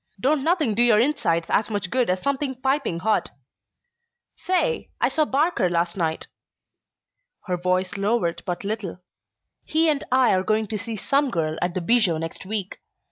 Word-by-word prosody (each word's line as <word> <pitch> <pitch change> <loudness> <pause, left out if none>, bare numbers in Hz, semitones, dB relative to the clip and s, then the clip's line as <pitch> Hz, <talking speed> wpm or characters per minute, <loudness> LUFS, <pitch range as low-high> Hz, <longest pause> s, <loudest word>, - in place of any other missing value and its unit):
Don't 275 +5 +1
nothing 315 - +2
do 225 - +1
your 235 -3 +5
insides 220 - +1
as 215 - +2
much 205 -4 -3
good 250 -3 +1
as 185 0 -1
something 280 -1 -1
piping 265 - 0
hot. 215 +2 +1 1.1
Say 370 +8 -1
I - - +2
saw 310 - +1
Barker 280 - +1
last 170 0 0
night." 160 -4 -2 1.2
Her 185 -3 -1
voice 185 +2 -1
lowered 195 -5 0
but 180 +1 -3
little. 205 -3 -4 0.7
"He 320 +1 +2
and 290 -2 0
I 255 -1 +4
are 185 - +2
going 215 +3 +1
to 220 - -2
see 225 +1 -5
'Some 275 +6 +1
Girl' 160 -6 -2
at 175 0 -1
the 185 - -1
Bijou 205 -4 +3
next 165 +3 -6
week. 200 -2 -4
215 Hz, 170 wpm, -24 LUFS, 180-270 Hz, 1.2 s, your